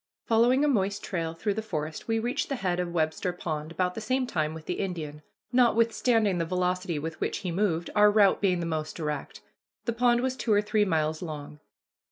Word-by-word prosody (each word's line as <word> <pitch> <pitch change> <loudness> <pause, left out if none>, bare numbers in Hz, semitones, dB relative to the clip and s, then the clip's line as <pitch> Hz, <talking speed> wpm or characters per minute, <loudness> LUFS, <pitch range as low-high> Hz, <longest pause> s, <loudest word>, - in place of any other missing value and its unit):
Following 245 +5 +4
a - - +3
moist 200 -6 0
trail 165 -3 -3
through 205 +5 -1
the 220 - -3
forest, 155 -7 -5
we 225 0 +1
reached 240 +5 -1
the 275 - -1
head 180 -7 -1
of 175 -1 -2
Webster 160 +2 0
Pond 155 -3 -4
about 180 +1 0
the 225 - -6
same 255 +4 0
time 155 -8 -1
with 160 -1 -9
the - - -3
Indian, 155 -6 -4 0.3
notwithstanding 230 -4 +3
the - - +1
velocity 180 0 -1
with 160 +2 -5
which - - -1
he 180 - -1
moved, 170 -2 0
our 210 0 +7
route 205 -2 +4
being 180 -3 +2
the - - -2
most 155 -2 -3
direct. 150 -4 -4 0.4
The 235 - 0
pond 240 0 +3
was 260 0 -1
two 235 -3 -2
or 205 0 +5
three 210 0 +2
miles 160 -3 0
long. 150 -3 -7
185 Hz, 210 wpm, -28 LUFS, 160-225 Hz, 0.4 s, our